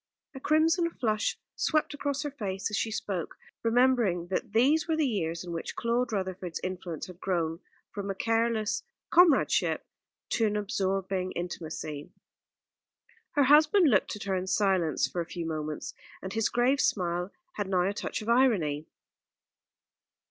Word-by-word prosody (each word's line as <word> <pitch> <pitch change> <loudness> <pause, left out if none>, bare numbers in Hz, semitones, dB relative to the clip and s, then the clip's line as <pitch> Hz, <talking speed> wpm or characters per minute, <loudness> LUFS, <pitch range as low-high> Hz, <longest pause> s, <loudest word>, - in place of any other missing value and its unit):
A 265 - -8
crimson 325 +4 +3
flush 215 -9 -1 0.2
swept 310 -1 +1
across 285 0 -2
her 290 - -3
face 200 -7 -3
as - - -1
she 220 - 0
spoke, 195 -5 -3 0.3
remembering 230 -7 +2
that 190 - -2
these 285 +8 +3
were 320 - +1
the 315 -1 +2
years 170 -9 -1
in 175 - -7
which 165 -1 -5
Claude 235 +2 0
Rutherford's 185 -4 -3
influence 180 -3 -4
had 180 -1 -12
grown 170 -3 -1 0.3
from 200 -1 -5
a 195 - -2
careless 225 -1 0 0.3
comradeship 340 -6 +4 0.4
to 225 - +2
an 210 - -1
absorbing 195 -2 -1
intimacy. 155 -4 -5 1.2
Her 290 - +4
husband 305 +4 +6
looked 195 - +2
at 210 - -7
her 195 - -1
in 185 0 -2
silence 185 -4 +2
for 175 - -3
a - - -4
few 170 -2 -4
moments; 155 -1 -4 0.3
and 190 0 -5
his 225 -1 +1
grave 255 +3 +2
smile 180 0 0 0.3
had 205 -2 -2
now 180 -2 +2
a 200 - -1
touch 215 - -4
of - - -10
irony. 190 - +2
200 Hz, 155 wpm, -29 LUFS, 180-245 Hz, 1.2 s, husband